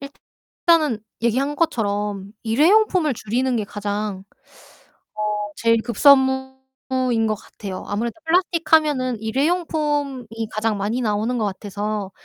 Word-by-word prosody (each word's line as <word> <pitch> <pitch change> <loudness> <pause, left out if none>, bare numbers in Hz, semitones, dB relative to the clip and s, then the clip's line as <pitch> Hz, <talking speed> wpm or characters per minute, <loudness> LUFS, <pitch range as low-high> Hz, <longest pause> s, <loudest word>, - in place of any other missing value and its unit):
일단은 295 0 -1 0.2
얘기한 265 +5 +1
것처럼 205 - -1
일회용품을 330 - +3
줄이는 245 +4 -1
게 215 - -1
가장 205 -1 -4 0.9
어 215 - -7 0.4
제일 230 -1 +2
급선무인 265 -1 +2
것 215 - +1
같아요. 195 -2 -8
아무래도 225 +3 -2
플라스틱 335 -1 0
하면은 285 -6 +3
일회용품이 290 0 -1 0.2
가장 215 -1 -1
많이 210 +5 -1
나오는 220 +2 0
것 220 - 0
같아서 205 0 -4
245 Hz, 285 characters per minute, -22 LUFS, 210-285 Hz, 0.9 s, 일회용품을